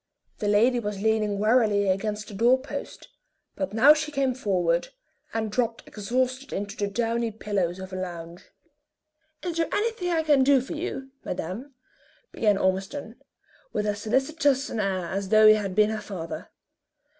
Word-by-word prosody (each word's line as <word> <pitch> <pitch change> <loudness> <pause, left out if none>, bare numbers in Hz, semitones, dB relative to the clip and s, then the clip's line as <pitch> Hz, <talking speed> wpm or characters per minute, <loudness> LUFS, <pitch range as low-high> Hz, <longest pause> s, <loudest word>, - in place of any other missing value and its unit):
The 210 - -1
lady 230 +5 +4
was 205 -3 -4
leaning 215 -2 +1
wearily 210 -2 +3
against 210 +2 -1
the - - -10
door 235 +6 +4
post, 270 - -7 0.5
but 190 -1 -3
now 250 +8 +7
she 305 0 -3
came 275 -3 +1
forward, 180 -8 0 0.4
and 220 -1 -2
dropped 230 0 -1
exhausted 255 +5 -2
into 205 +1 -4
the 205 - -1
downy 230 +2 -1
pillows 200 -5 -2
of 190 0 -8
a - - -3
lounge. 175 -2 -7 0.9
"Is 345 -2 -3
there 330 - +1
anything 425 -4 -1
I 330 -2 +1
can 290 -4 +4
do 275 0 +5
for 255 - -6
you, 285 -5 -5
madame?" 210 - -5 0.6
began 210 -3 +2
Ormiston, 195 +7 -2 0.5
with 210 - -1
as 210 0 -2
solicitous 270 +4 +1
an 225 - -3
air 190 -3 -1
as 195 +2 -3
though 215 +1 +6
he 215 - +9
had 200 -3 -2
been 215 +1 +4
her 220 -1 -3
father. 190 -5 -6
215 Hz, 165 wpm, -26 LUFS, 200-260 Hz, 0.9 s, he